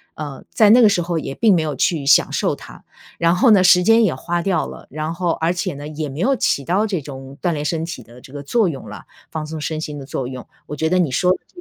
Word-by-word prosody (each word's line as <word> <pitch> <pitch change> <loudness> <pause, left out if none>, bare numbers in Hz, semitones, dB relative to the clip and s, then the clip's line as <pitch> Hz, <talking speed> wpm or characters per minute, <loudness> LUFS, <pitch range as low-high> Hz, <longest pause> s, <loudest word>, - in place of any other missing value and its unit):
呃， 145 -3 -7
在 215 -2 +4
那 245 +2 +7
个 220 - +7
时 175 -4 +1
候 170 -1 -2
也 135 - -6
并 220 -3 +4
没 170 - +2
有 155 -2 -3
去 155 +2 0
享 140 0 +4
受 - - 0
它。 - - -14 0.4
然 170 +1 +3
后 225 +6 +4
呢， 195 -3 +6
时 180 0 +6
间 225 +4 +5
也 185 -10 +1
花 175 +6 -2
掉 170 -3 0
了， - - -11
然 155 +2 -4
后 175 0 -2
而 165 +2 0
且 180 -4 -3
呢， 145 +1 -8
也 155 -1 -5
没 135 +3 -8
有 270 +9 +2
起 140 - 0
到 200 +8 +1
这 185 -5 -2
种 135 -1 -10
锻 175 - +2
炼 145 -1 -3
身 160 +2 -2
体 170 - -7
的 120 +1 -16
这 130 - -15
个 145 - -6
作 215 +9 +1
用 140 -6 -6
了， - - -9 0.3
放 155 -1 -5
松 155 0 -6
身 155 0 -3
心 150 -2 -6
的 135 - -9
作 130 -2 -4
用。 130 -1 -8 0.2
我 150 - -6
觉 160 +2 -1
得 185 - +2
你 165 -7 +1
说 180 +7 +2
的 185 - +1
这 - - -34
160 Hz, 305 characters per minute, -20 LUFS, 145-180 Hz, 0.4 s, 那